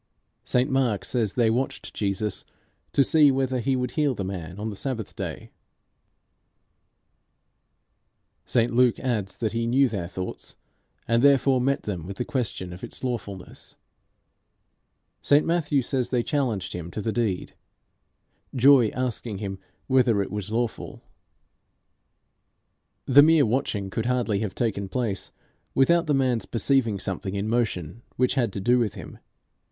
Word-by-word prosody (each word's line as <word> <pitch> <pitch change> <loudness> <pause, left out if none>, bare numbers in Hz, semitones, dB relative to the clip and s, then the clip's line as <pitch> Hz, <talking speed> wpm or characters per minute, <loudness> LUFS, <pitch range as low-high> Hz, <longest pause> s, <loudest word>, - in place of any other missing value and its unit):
St 125 +1 +1
Mark 130 -8 0
says 110 -6 -1
they 115 -3 +3
watched 130 +4 -3
Jesus 100 0 -2 0.5
to 140 - +4
see 150 0 +5
whether 130 -1 0
he 130 +3 0
would 125 -1 -2
heal 145 -3 +1
the 100 - -3
man 90 -2 -6
on 110 +1 -3
the - - -7
Sabbath 115 -2 -5
day; - - -6 2.9
St 120 0 +1
Luke 125 0 +3
adds 110 -7 -2
that 110 -3 -1
he 115 0 -1
knew 135 +3 +4
their 100 -7 -4
thoughts, 95 0 -7 0.5
and 115 +1 +3
therefore 135 -2 +4
met 140 +2 0
them 90 -5 -4
with 100 0 -7
the 125 - -2
question 100 -9 -3
of 90 - -11
its - - -7
lawfulness; 105 -7 -6 1.5
St 145 +1 +4
Matthew 150 -5 +1
says 130 0 -1
they 125 -2 +1
challenged 125 - -1
him 85 -1 -6
to 105 - -5
the 110 - 0
deed 110 -6 -1 1.0
Joy 130 -2 +6
asking 120 -4 -3
him 95 -1 -5 0.3
whether 125 -5 +3
it - - -8
was 105 0 -4
lawful. 115 0 -3 2.0
The 140 +2 +7
mere 155 -1 +5
watching 105 -4 -1
could 115 +3 -2
hardly 120 -5 0
have 105 -3 -3
taken 100 -5 -2
place 105 -2 -3 0.4
without 170 +5 +4
the 150 - +2
man's 125 -6 +1
perceiving 115 -4 +1
something 95 +1 -4
in 100 +1 -2
motion 110 -5 -1
which 125 0 +2
had 120 -6 +1
to - - -4
do 120 +6 +3
with 110 -3 -1
him. 95 -7 -10
115 Hz, 145 wpm, -25 LUFS, 100-130 Hz, 2.9 s, The